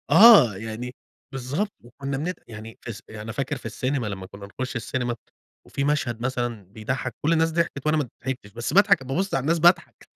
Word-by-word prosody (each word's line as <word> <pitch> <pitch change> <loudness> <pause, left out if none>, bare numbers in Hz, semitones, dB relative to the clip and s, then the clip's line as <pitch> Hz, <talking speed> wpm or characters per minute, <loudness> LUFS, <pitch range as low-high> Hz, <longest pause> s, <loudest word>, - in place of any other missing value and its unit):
آه، 195 - +9
يعني 115 +4 -6 0.4
بالضبط 140 +11 -2
وكنّا 135 +3 -5
بنت 175 +7 -3
يعني 110 0 -9
فالس 115 -3 -7
يعني 110 -1 -8
أنا 110 +1 -6
فاكر 140 +3 -2
في 125 - -9
السينما 125 +2 -1
لمّا 95 -2 -5
كنا 100 +1 -10
نخش 130 +6 -5
السينما، 120 +1 -2 0.5
وفي 140 - -2
مشهد 130 -6 0
مثلًا 120 -4 -2
بيضحّك 110 +7 -4
كل 160 - +2
الناس 165 0 +3
ضحكت 160 -4 -1
وأنا 155 +1 +3
ما 145 -5 0 0.2
ضحكنش 125 -6 -4
بس 120 +2 -3
باضحك 200 -8 +5
بابُص 175 +10 -1
على 135 - +1
الناس 165 +5 +2
باضحك 175 +3 +3
130 Hz, 190 wpm, -25 LUFS, 115-150 Hz, 0.5 s, آه